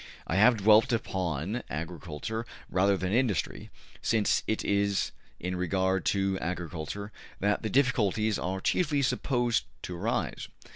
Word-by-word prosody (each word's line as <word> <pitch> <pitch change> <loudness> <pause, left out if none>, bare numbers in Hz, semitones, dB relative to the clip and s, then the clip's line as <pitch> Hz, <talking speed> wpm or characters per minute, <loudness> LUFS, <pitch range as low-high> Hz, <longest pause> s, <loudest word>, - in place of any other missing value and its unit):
I 80 - -2
have 115 +4 +6
dwelt 110 +4 +5
upon 95 - -1
agriculture 85 +7 -4 0.3
rather 100 +1 +3
than 95 +1 -2
industry, 120 -6 0 0.3
since 110 -3 +2
it 110 - -1
is 100 -1 +1 0.3
in 90 +1 -3
regard 95 0 0
to 95 -1 +1
agriculture 90 +3 -4 0.3
that 105 +1 +1
the 110 - -2
difficulties 110 -4 +2
are 95 +1 -2
chiefly 145 - +1
supposed 120 -3 +1 0.2
to 90 - -5
arise. 85 - -2
100 Hz, 130 wpm, -29 LUFS, 90-110 Hz, 0.3 s, have